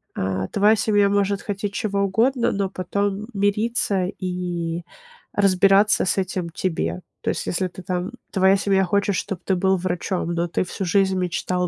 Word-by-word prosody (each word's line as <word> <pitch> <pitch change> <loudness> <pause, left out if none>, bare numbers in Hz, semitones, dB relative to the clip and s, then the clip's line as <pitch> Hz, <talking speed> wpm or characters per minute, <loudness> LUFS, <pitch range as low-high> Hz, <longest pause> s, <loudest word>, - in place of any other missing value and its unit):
а, 95 0 -2
твоя 210 +2 +4
семья 205 -2 +3
может 200 0 +1
хотеть 200 0 -4
чего 200 -1 -1
угодно, 230 +6 +2
но 195 -1 -1
потом 200 +2 -2
мириться 205 -1 +1
и 175 -3 -3 0.5
разбираться 195 +1 +4
с 185 - 0
этим 185 -2 -2
тебе. 90 - -2 0.2
То - - -2
есть - - -4
если 185 +1 0
ты 180 +1 -11
там 180 +3 -2 0.2
твоя 190 0 +4
семья 195 -1 +2
хочет, 200 +1 +1
чтоб 195 0 -3
ты 190 - +1
был 190 +1 +2
врачом, 180 -1 -2
но 170 +1 0
ты 170 - -1
всю 190 +2 -5
жизнь 190 +1 +2
мечтал 180 0 -1
190 Hz, 165 wpm, -22 LUFS, 180-200 Hz, 0.5 s, твоя